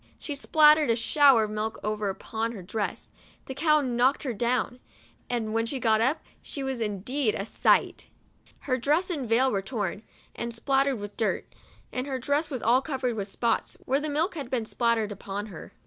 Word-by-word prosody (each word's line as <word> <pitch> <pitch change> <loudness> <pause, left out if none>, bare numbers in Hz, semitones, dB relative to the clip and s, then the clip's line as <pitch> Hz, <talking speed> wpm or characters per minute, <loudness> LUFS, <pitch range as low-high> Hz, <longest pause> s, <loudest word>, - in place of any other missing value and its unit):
She 295 - -5
spattered 300 +1 +5
a 230 - +4
shower 265 0 +5
of 210 - -3
milk 215 +1 -3
over 210 -1 -1
upon 225 +4 -3
her 195 -5 -8
dress; 205 +3 -4 0.3
the 265 - -6
cow 305 +2 +3
knocked 255 +2 +1
her 260 -4 -2
.down; 240 +2 -1 0.5
and 225 -3 -2
when 225 0 0
she 270 +2 -3
got 220 -2 +3
up, 265 +7 +1 0.2
she 280 - -5
was 265 -3 -3
indeed 220 +4 0
a 195 - -3
sight! - - +1 0.5
Her 255 -2 -1
dress 310 +9 +1
and 275 -9 -3
veil 255 +3 +4
were 195 - 0
torn, 205 -3 -3 0.3
and 235 0 -4
spattered 270 +2 +1
with 205 -1 -8
dirt, 225 - -1 0.4
and 255 +2 -2
her 270 -2 -2
dress 285 +5 0
was 255 -5 -5
all 245 +3 +4
covered 260 -5 -2
with 200 -2 -3
spots, 230 +3 -1
where 270 +2 +2
the 305 +1 -3
milk 315 +6 0
had 285 -7 -6
been 245 -4 -1
spattered 230 -2 0
upon 200 +1 -5
her. 160 - -10
245 Hz, 195 wpm, -27 LUFS, 220-275 Hz, 0.5 s, spattered